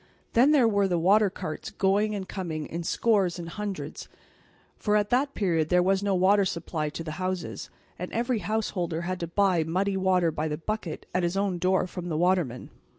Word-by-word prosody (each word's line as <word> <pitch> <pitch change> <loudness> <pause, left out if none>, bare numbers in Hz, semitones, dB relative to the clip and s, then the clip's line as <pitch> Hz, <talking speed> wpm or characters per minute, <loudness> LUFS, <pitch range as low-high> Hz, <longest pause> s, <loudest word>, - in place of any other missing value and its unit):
Then 250 +5 +5
there 280 -6 +5
were 200 -2 +2
the 180 -2 0
water 200 +5 +4
carts 180 -4 -6
going 205 +2 +1
and 190 -2 -5
coming 165 -6 -4
in 170 - -5
scores 190 0 +1
and 170 -1 -6
hundreds, 200 +2 -6 0.7
for 210 -1 0
at 205 +1 +1
that 275 +3 +1
period 165 -6 +1
there 180 0 +4
was 190 +1 +2
no 200 -1 +1
water 195 +3 +4
supply 170 -4 -2
to 165 - -6
the 155 +2 -6
houses, 185 -1 -3 0.3
and 180 - -5
every 240 0 0
house 215 +3 -1
holder 170 -3 -2
had 185 +1 -3
to 170 - -3
buy 185 -1 +2
muddy 190 +5 0
water 185 -3 +2
by 155 0 -2
the 150 -1 -3
bucket 185 -1 -4
at 180 - +1
his 175 +2 -1
own 195 -3 0
door 185 +1 +2
from 180 -1 -6
the 155 - -1
watermen. 175 -8 0
185 Hz, 205 wpm, -27 LUFS, 170-200 Hz, 0.7 s, Then